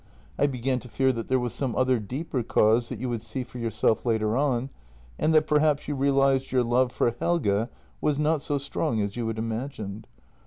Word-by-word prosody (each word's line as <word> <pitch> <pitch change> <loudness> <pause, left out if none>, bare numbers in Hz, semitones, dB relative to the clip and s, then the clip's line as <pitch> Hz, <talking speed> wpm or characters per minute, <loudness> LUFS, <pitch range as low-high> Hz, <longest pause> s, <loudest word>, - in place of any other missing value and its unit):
I 145 - +4
began 130 -1 -1
to 125 - -12
fear 130 +2 +2
that 115 -2 -5
there 130 - +2
was 125 -2 -2
some 130 -4 -2
other 130 -1 +2
deeper 130 +5 -3
cause 115 +1 +3
that 125 - -5
you 130 +4 -3
would 120 -2 -2
see 115 +3 -4
for 125 0 -10
yourself 115 -1 +1
later 110 -2 +1
on, 135 -1 0 0.5
and 160 - +2
that 155 0 +5
per 150 -1 +3
haps 150 -2 +1
you 145 - -1
realized 135 -1 +2
your 125 -1 +3
love 120 +1 +2
for 120 - +1
Helge 115 -10 +1 0.3
was 150 -2 +1
not 150 0 +1
so 145 - -1
strong 135 -5 -2
as 100 0 -2
you 120 -2 -2
had 115 0 -3
imagined. 110 -2 -4
125 Hz, 210 wpm, -26 LUFS, 115-140 Hz, 0.5 s, that